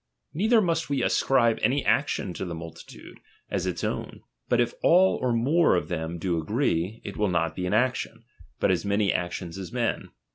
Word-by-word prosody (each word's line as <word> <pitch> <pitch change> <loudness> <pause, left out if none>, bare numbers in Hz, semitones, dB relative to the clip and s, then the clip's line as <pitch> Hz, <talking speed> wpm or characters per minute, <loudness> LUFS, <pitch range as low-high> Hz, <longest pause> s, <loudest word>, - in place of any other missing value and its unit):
Neither 220 +6 +3
must 165 -4 -1
we 135 -3 0
ascribe 120 -4 +2
any 135 +2 +1
action 135 -9 0
to - - -5
the 85 -3 -5
multitude, 80 0 -11 0.3
as - - -1
its - - -3
own; - - -4 0.3
but - - +3
if 120 -1 +1
all 185 +3 +5
or 125 -1 +1
more 135 - +3
of 90 - -2
them 85 -1 -3
do 85 -1 -1
agree, 105 - -1
it - - -6
will 105 -2 +1
not 85 -3 0
be 90 -1 -3
an 90 - -1
action, 125 +3 -1 0.4
but - - +2
as - - 0
many 100 -1 +1
actions 85 +1 -4
as 95 +1 -7
men. 120 -2 -2
105 Hz, 190 wpm, -26 LUFS, 85-135 Hz, 0.4 s, all